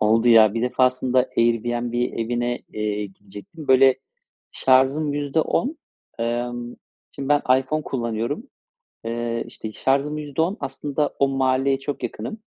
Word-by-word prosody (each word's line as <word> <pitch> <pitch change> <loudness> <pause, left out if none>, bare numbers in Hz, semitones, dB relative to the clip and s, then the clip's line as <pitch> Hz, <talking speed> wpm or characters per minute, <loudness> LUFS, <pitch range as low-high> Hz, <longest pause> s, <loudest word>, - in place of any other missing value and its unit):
Oldu 115 +2 +3
ya. 110 -2 +7
Bir 115 - -1
defasında 125 0 +2
Airbnb 120 +1 +1
evine, 120 0 -1
eee, 105 -1 -2
gidecektim. 105 - -12
Böyle, 130 0 +6 0.6
şarjım 135 +3 +3
%10, 160 - 0 0.4
emm, 120 +1 -3 0.4
şimdi, 135 -1 -6
ben 145 0 +3 0.2
iPhone 155 +4 -2
kullanıyorum. 120 - -3 0.6
Eee, 115 0 -2
işte, 110 - -8
şarjım 140 +5 0
%10, 160 +7 -1
aslında 145 +2 -2
o 140 - +3
mahalleye 135 0 +1
çok 140 0 -5
yakınım. 170 - -5
130 Hz, 120 wpm, -23 LUFS, 115-140 Hz, 0.6 s, ya